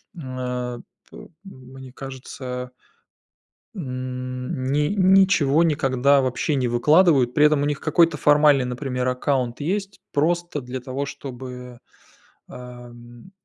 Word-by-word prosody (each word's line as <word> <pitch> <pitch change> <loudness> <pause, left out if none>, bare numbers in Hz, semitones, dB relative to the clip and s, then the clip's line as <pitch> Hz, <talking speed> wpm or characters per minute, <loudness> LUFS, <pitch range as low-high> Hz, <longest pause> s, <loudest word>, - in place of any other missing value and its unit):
м, 165 - -9 0.2
а, 125 -1 -4 0.3
п - - -12 0.2
мне 130 -7 -12
кажется. 130 -2 -7 1.0
М, 130 -2 -5
ни 150 +2 +1
ничего 185 -6 +4
никогда 140 -3 +2
вообще 130 +4 -1
не 130 -3 0
выкладывают. 135 +1 +3
При 150 - +4
этом 150 -1 +3
у - - +1
них 145 -1 -2
какой-то 165 -3 +2
формальный, 145 -2 +4
например, 125 0 -3
аккаунт 125 0 -1
есть 195 +5 -3
просто 170 0 0
для 125 +1 -6
того, 135 +2 -5
чтобы, 125 -2 -9 0.7
а, 125 -1 -10
м, 120 +6 -15
130 Hz, 120 wpm, -22 LUFS, 125-150 Hz, 1.0 s, ничего